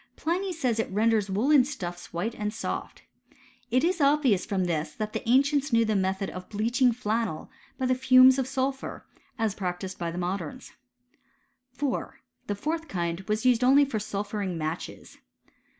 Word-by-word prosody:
Pliny 365 +4 -1
says, 255 -9 -1
it - - -1
renders 215 0 +2
woollen 255 +8 +4
stuffs 180 -11 -6
white 190 +7 -2
and 210 -1 -3
soft. 220 - -5 0.7
It 255 +4 +2
is 345 -1 +1
obvious 275 -8 +3
from 195 -4 0
this, 155 -2 -2
that 215 0 -4
the 230 - -4
ancients 280 +2 +3
knew 230 -1 +4
the 215 -1 0
method 190 0 -1
of 185 0 -9
bleaching 240 +4 +2
flannel 225 -7 -2 0.3
by 260 - -1
the 255 - +3
fumes 255 +1 +6
of 260 - -1
sulphur, 265 0 -3 0.3
as 225 -4 0
practised 185 -1 -4
by 170 -1 -2
the 170 - -6
modems. 180 - -4 1.0
4. 270 0 -3 0.3
The 205 - -1
fourth 320 +9 -3
kind 170 - -2
was 215 +2 -1
used 250 -1 +4
only 275 +3 +6
for 235 -6 -3
sulphuring 205 -3 -3
matches. 160 +2 -6
225 Hz, 165 wpm, -27 LUFS, 190-260 Hz, 1.0 s, fumes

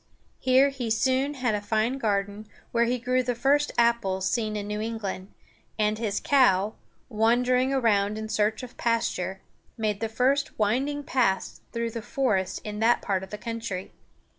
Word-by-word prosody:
Here 260 +2 +4
he 260 -4 -4
soon 260 +5 +1
had 250 -4 0
a 210 - -1
fine 220 +5 0
garden, 205 -1 -1 0.2
where 235 0 +3
he 245 +2 0
grew 250 +1 +1
the 245 -1 -2
first 285 +5 +2
apples 230 -6 +2
seen 215 0 -1
in 205 -1 -3
New 210 +1 -3
England; 210 -4 -4 0.5
and 215 0 +1
his 210 -3 -1
cow, 215 -7 +3 0.3
wandering 250 +3 +2
around 215 -6 +2
in 220 0 -4
search 215 +2 0
of 250 - -10
pasture, 195 -5 -1 0.4
made 215 -3 -1
the 225 0 -2
first 270 +6 +1
winding 265 +8 0
paths 230 -9 0
through 230 -1 -2
the 230 - -5
forest 210 - -1
in 210 0 -5
that 230 +2 +3
part 195 -2 0
of 190 - -9
the 210 - -6
country. 225 -4 -5
225 Hz, 165 wpm, -26 LUFS, 210-250 Hz, 0.5 s, Here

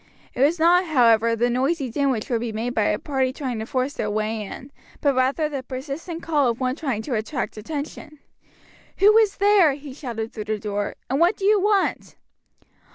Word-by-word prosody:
It 245 - -3
was 300 +5 +4
not, 350 +3 +4
however, 230 -6 +4
the 235 +2 +1
noisy 265 +1 0
din 280 +3 +1
which 230 -5 -2
would 230 -2 +1
be 235 -1 -3
made 230 +3 -3
by 215 -3 +1
a 210 - +1
party 265 -1 -1
trying 260 -4 -4
to 220 - -5
force 260 +2 -1
their 210 - -3
way 215 +1 -2
in, 255 +6 -9 0.3
but 285 -2 +2
rather 265 +4 +1
the 285 -3 -4
persistent 280 +6 -6
call 295 -5 +2
of 235 - -3
one 255 0 -1
trying 265 -9 -3
to 260 - -4
attract 235 +4 -3
attention. 295 +5 -7 0.8
"Who 415 +2 +6
is 425 -3 +2
there?" 400 -7 +5
he 280 -1 -9
shouted 235 -5 -5
through 215 -2 -6
the 215 0 -2
door; 205 -1 -3
"and 270 +2 -1
what 345 +5 +3
do 390 - -3
you 415 -1 +4
want?" 405 -1 0
265 Hz, 205 wpm, -23 LUFS, 230-310 Hz, 0.8 s, Who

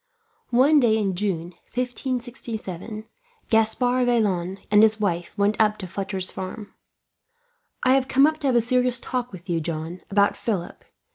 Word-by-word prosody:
One 270 +5 +5
day 225 -4 +3
in 200 -3 0
June, 175 -3 -2 0.2
1567, 235 -5 -4 0.5
Gaspard 245 +3 +2
Vaillant 195 -6 +1
and 210 0 +7
his 220 0 +4
wife 175 -2 -2
went 205 +2 +2
up 215 0 +3
to 190 - -6
Fletcher's 190 0 -4
farm. 200 +3 -7 1.1
"I 255 -1 +5
have 265 -1 +2
come 270 +1 +5
up 310 0 +1
to 290 - -1
have 255 - +2
a 235 - +5
serious 250 +1 +1
talk 250 -1 -3
with 185 -1 -11
you, 170 -2 0
John, 165 +2 -5
about 200 0 +3
Philip. 195 -7 -4
215 Hz, 155 wpm, -24 LUFS, 190-245 Hz, 1.1 s, and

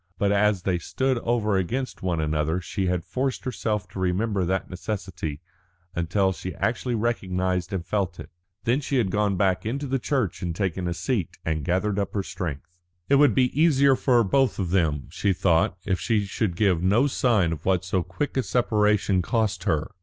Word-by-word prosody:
But 100 0 +1
as 100 -2 +2
they 90 -2 0
stood 130 +8 -1
over 110 -4 +1
against 125 +8 -2
one 90 -3 -1
another 80 +2 0
she 95 +2 -3
had 90 -2 0
forced 130 +5 -2
herself 110 -5 -2
to - - -8
remember 95 +2 0
that 95 +2 -1
necessity 90 -6 -5 0.5
until 95 +3 +1
she 95 0 -6
actually 120 +1 -1
recognised 95 -6 -1
and 95 -3 -3
felt 95 -4 -2
it. - - -9 0.3
Then 125 +4 +1
she 140 - -2
had 105 -7 +1
gone 100 -1 +1
back 95 -1 +1
into 135 +6 -3
the 135 0 -1
church 120 - -1
and 85 -3 -3
taken 95 -1 -1
a 85 - -2
seat, 100 - -2
and 80 -2 -1
gathered 95 +5 0
up 100 - -3
her 100 - 0
strength. 80 -6 -5 0.4
It 140 - +6
would 145 -6 +5
be 125 -1 +2
easier 140 -4 +5
for 125 -3 +3
both 130 +4 +2
of 90 -4 -2
them, 80 -7 +1
she 100 -2 +1
thought, 90 +2 +2
if 95 -3 0
she 110 -4 +1
should 95 -1 -2
give 90 -3 +2
no 105 +9 +3
sign 115 - +2
of 80 - -7
what 95 -1 +1
so 90 0 0
quick 95 +12 -4
a - - +4
separation 105 -4 +2
cost 105 -2 -1
her. 80 -1 0
100 Hz, 190 wpm, -25 LUFS, 90-115 Hz, 0.5 s, It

